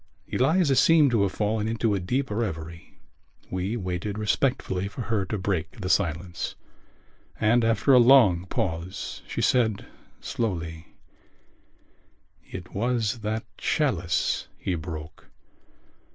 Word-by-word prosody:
Eliza 145 +2 +2
seemed 155 -1 +5
to 115 -4 +2
have 100 -1 +1
fallen 105 +2 -1
into 115 -1 0
a 100 - 0
deep 125 +8 -1
revery. 85 -7 -4 0.5
We 95 +5 -2
waited 95 +1 -3
respectfully 105 -3 0
for 105 - -7
her 110 -5 -1
to 105 +3 -3
break 95 +2 -2
the 90 -3 -3
silence: 85 -2 -1 0.8
and 115 +3 +3
after 115 +4 +3
a 125 - +8
long 115 -9 +6
pause 85 +1 -3
she - - -3
said 110 -5 +2 0.3
slowly: 85 -7 -3 1.6
"It 90 -1 -8
was 115 +1 0
that 110 0 -3
chalice 100 - 0
he 95 - -2
broke.... 80 -2 -7
105 Hz, 120 wpm, -26 LUFS, 90-120 Hz, 1.6 s, a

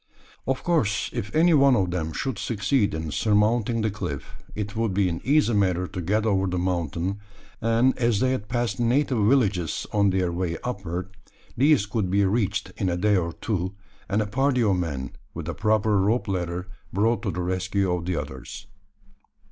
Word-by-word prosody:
Of 130 0 -1
course, 135 -13 +1
if 105 +6 -4
any 165 +2 +5
one 140 -3 +6
of 95 -5 +1
them 80 -3 -2
should 130 - -3
succeed 105 - 0
in 80 -1 -4
surmounting 110 +3 +2
the 110 - +1
cliff, 100 - -5 0.2
it 105 0 -4
would 110 -4 0
be 100 -1 +3
an 85 -2 -3
easy 140 -1 +3
matter 90 -3 +2
to 90 - -5
get 105 +6 0
over 95 -3 +2
the 90 0 -1
mountain; 90 +1 -1 0.4
and 115 +3 +3
as 120 -4 +2
they 130 +3 +2
had 105 -6 -2
passed 120 0 -1
native 125 +1 +2
villages 105 - +2
on 100 -1 +4
their 95 -2 +1
way 85 -1 -2
upward, 95 -5 -4 0.4
these 140 -4 +4
could 105 -3 -1
be 100 +2 +3
reached 100 -1 0
in 95 - 0
a 85 - -1
day 105 +3 +3
or 85 -3 0
two, 95 -2 -3 0.3
and 105 +2 +2
a - - -5
party 125 +3 +1
of 100 -3 +3
men, 70 -7 -3 0.2
with - - -5
a - - -2
proper 110 0 +2
rope 110 +6 +1
ladder, 90 -2 -2 0.3
brought 110 +4 +1
to 105 - -2
the 90 0 -3
rescue 95 +1 0
of 90 -1 -2
the 90 0 -1
others. 65 -3 -6
100 Hz, 190 wpm, -25 LUFS, 90-115 Hz, 0.4 s, one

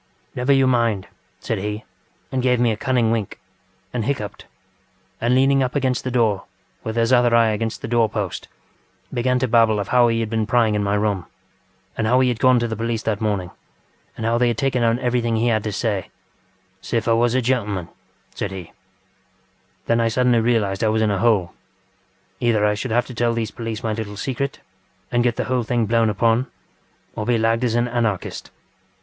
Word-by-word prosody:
ŌĆśNever 135 +3 +2
you 135 - +4
mind, 115 -6 +1
ŌĆÖ - - -26
said - - -1
he, 105 +2 -4 0.5
and 130 - 0
gave 125 -1 +2
me 120 -1 +3
a - - -1
cunning 120 -1 +1
wink, 110 -4 -2 0.5
and 120 -3 -1
hiccuped, 105 -4 -4 0.8
and 120 +2 +2
leaning 135 +1 +4
up 130 +1 -1
against 130 -3 0
the 130 - -2
door, 115 -6 +1 0.4
with 110 - -4
his 115 +2 +2
other 120 -1 +4
eye 115 -1 +5
against 110 +1 -3
the - - -3
door 115 -1 +2
post, 105 -4 -4 0.7
began 125 0 +1
to 130 +1 0
babble 115 -2 +3
of 100 - -4
how 125 -1 +5
he 115 -1 +1
had 115 - -1
been 110 -1 -1
prying 115 -2 +3
in 105 -1 0
my 100 0 +1
room, 105 -4 -1 0.7
and 110 - -1
how 125 +3 +4
he 130 -1 +3
had 120 -2 -2
gone 130 -1 +5
to 120 0 0
the 110 - -3
police 115 0 -2
that 110 -2 -1
morning, 100 -5 -1 0.7
and 110 - -4
how 115 +1 +1
they 125 - +3
had 120 - 0
taken 135 -3 0
down 115 0 +2
everything 120 -2 0
he 115 +2 +1
had 110 -2 +2
to 110 - -2
sayŌĆöŌĆśŌĆÖsiffiwas 110 +2 -3
a 130 - +3
geŌĆÖm, 125 -3 +1
ŌĆÖ 95 -5 -4 0.5
said 105 - -3
he. 95 -3 -8 1.1
Then 115 0 +2
I 115 - +2
suddenly 120 +1 +2
realised 110 -4 +1
I - - +3
was 110 0 +2
in 105 - +2
a 100 - -1
hole. 105 -6 +2 0.9
Either 110 -3 +2
I 105 - +3
should 105 +5 -4
have 120 +2 +1
to 130 - -9
tell 120 0 +1
these 110 -2 -2
police 115 0 -5
my 110 -1 -1
little 105 -2 -5
secret, 135 +4 -3 0.5
and 120 0 +2
get 120 -1 +1
the - - -1
whole 130 -1 0
thing 120 0 0
blown 115 +1 +2
upon, 115 +4 +1 0.7
or - - -3
be 120 -1 +3
lagged 115 +2 +1
as 120 -2 +1
an 120 +1 +2
Anarchist. 115 -5 -2
115 Hz, 205 wpm, -21 LUFS, 110-125 Hz, 1.1 s, eye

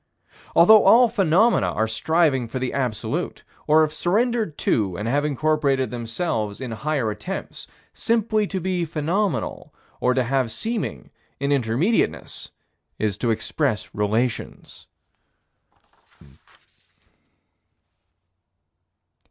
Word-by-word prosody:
Although 210 +6 +7
all 245 +1 +7
phenomena 205 +1 +3
are 110 - 0
striving 135 +2 +1
for 120 - -5
the 130 0 -3
Absolute 125 -6 -3 0.2
or 155 +1 +5
have 155 -1 +1
surrendered 215 - 0
to 95 -5 0
and 105 - -4
have 145 +5 +1
incorporated 145 -2 0
themselves 115 -3 -3
in 130 -3 -5
higher 130 -1 -1
attempts, 185 - -6 0.3
simply 220 -2 0
to 190 - -3
be 180 0 -1
phenomenal, 160 - -2 0.2
or 125 0 +1
to 130 - +2
have 130 -1 0
seeming 150 - -4 0.3
in 140 +1 -1
Intermediateness 140 - 0 0.5
is 105 -3 -1
to 120 - 0
express 110 -2 -1
relations. 110 +4 -3
140 Hz, 105 wpm, -23 LUFS, 115-180 Hz, 0.5 s, Although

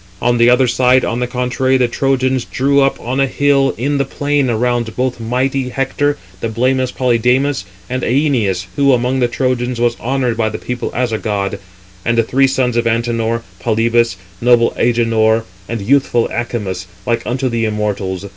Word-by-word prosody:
On 120 0 +1
the 120 +1 +6
other 125 +1 +4
side, 125 +1 +3
on 115 - -2
the 125 - -1
contrary, 125 +1 0
the 125 -1 +2
Trojans 130 0 0
[drew 140 +2 +1
up] 135 0 +1
on 130 +3 -3
a 135 - +3
hill 140 0 +2
in 140 +4 -1
the - - +3
plain 145 0 -1
around 120 0 -1
both 125 -1 -1
mighty 125 +3 -1
Hector, 135 +3 -1 0.2
blameless 125 +3 0
Polydamas, 125 0 +1 0.2
and 130 +3 -3
Æneas, 120 - +1
who, 140 -1 +4
among 125 +2 +1
the 125 - +3
Trojans, 125 -1 -1
was 120 0 +1
honoured 125 -2 -1
by 110 -1 +1
the - - -5
people 125 0 -4
as 125 -1 0
a 110 - -1
god; 100 -2 -2 0.4
and 115 0 0
the 115 - +4
three 135 +4 +2
sons 125 -2 0
of 120 0 +1
Antenor, 115 0 0 0.2
Polybus, 115 0 +1 0.3
noble 120 -1 +4
Agenor, 115 -2 +2 0.3
and 115 -3 -3
youthful 125 0 +2
Acamas, 105 -6 -3 0.2
like 115 -1 0
unto 130 +2 -1
the 115 -2 -1
immortals. 105 -3 -2
120 Hz, 175 wpm, -16 LUFS, 115-130 Hz, 0.4 s, the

